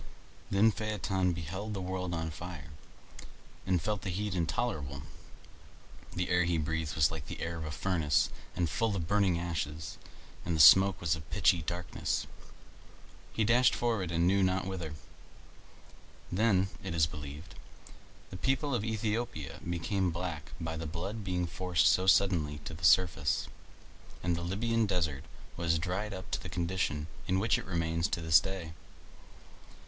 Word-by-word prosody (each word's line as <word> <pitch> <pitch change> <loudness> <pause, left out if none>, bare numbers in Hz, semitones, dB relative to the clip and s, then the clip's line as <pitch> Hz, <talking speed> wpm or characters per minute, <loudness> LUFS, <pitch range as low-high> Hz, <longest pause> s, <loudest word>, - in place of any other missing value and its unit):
Then 105 +3 +5
Phaeton 100 -4 -1
beheld 95 +6 -4
the - - -3
world 90 -1 -3
on 80 -1 -3
fire, 80 -3 -8 1.0
and 90 -2 +3
felt 105 +4 -2
the 95 - -4
heat 100 +3 -2
intolerable. 80 - -2 1.1
The 90 0 -1
air 90 0 +4
he 85 -1 +1
breathed 80 -1 -2
was 75 -2 +4
like 80 -3 -6
the - - -6
air 85 0 -3
of 80 - -4
a - - -4
furnace 75 0 +1 0.2
and 85 - +1
full 105 +7 0
of 85 -4 -3
burning 100 -3 +3
ashes, 80 -2 -4 0.4
and 85 - -1
the - - -1
smoke 95 +5 +8
was 85 0 +1
of 80 - -7
a - - -16
pitchy 85 - +3
darkness. 85 +2 -2 1.1
He 110 - 0
dashed 120 +3 +4
forward 110 -7 0
he 85 - -2
knew 90 +4 +3
not 95 0 +1
whither. 90 -5 -5 1.4
Then, 95 -1 +3
it 95 -3 -3
is 80 -2 +4
believed, 75 +2 -8 0.8
the 95 - -6
people 135 +5 0
of 120 - +1
Aethiopia 110 - -2
became 90 +2 0
black 85 -3 -4
by 80 -1 -3
the 80 0 -4
blood 95 +7 -4
being 90 -2 -1
forced 90 0 +1
so 95 +1 +4
suddenly 90 -7 +3
to - - -5
the 80 +2 -10
surface, 85 -5 +3 0.8
and 90 0 +1
the 85 - -4
Libyan 110 +5 0
desert 80 -8 -1 0.3
was 85 -1 +1
dried 95 +5 -2
up 95 -1 -8
to - - -1
the 95 - -7
condition 85 -3 -1 0.2
in 95 - +2
which 105 +3 +2
it - - -8
remains 85 -2 0
to 95 - -2
this 80 -1 +6
day. 95 -4 -5
90 Hz, 160 wpm, -31 LUFS, 80-95 Hz, 1.4 s, smoke